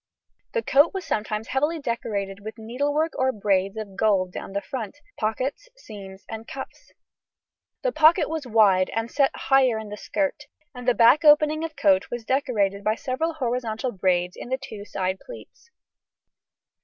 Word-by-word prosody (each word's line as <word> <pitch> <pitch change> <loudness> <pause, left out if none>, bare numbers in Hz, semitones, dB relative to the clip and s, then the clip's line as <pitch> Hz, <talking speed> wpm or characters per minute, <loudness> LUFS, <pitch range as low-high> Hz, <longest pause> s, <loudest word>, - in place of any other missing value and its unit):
The 470 -2 0
coat 290 +7 +4
was 380 - -4
sometimes 215 +1 -2
heavily 295 +5 0
decorated 210 -7 -3
with 215 +2 -8
needlework 285 +8 -1
or 260 0 +3
braids 195 -2 0
of 205 -3 -6
gold 195 -4 +2
down 195 - -7
the 200 - 0
front, 225 +3 -6 0.2
pockets, 260 - -2
seams, 195 - -11
and 225 +1 -7
cuffs. 265 - -9 0.9
The - - +1
pocket 325 -2 +5
was 315 -4 -4
wide 205 -5 +4
and 225 +1 -2
set 275 -2 +3
higher 265 -4 +3
in 220 -1 -6
the 210 - -7
skirt, 295 +3 -2 0.3
and 250 -1 -9
the 245 - +4
back 240 +7 +6
opening 305 +1 +5
of 325 -2 -5
coat 190 -1 +3
was 240 -2 -5
decorated 220 -8 0
by 215 +1 +1
several 315 +8 -2
horizontal 245 -3 -2
braids 180 -2 0
to - - -8
the 260 - 0
two 220 -6 -9
side 190 -2 -2
pleats. - - -13
235 Hz, 165 wpm, -24 LUFS, 205-285 Hz, 0.9 s, back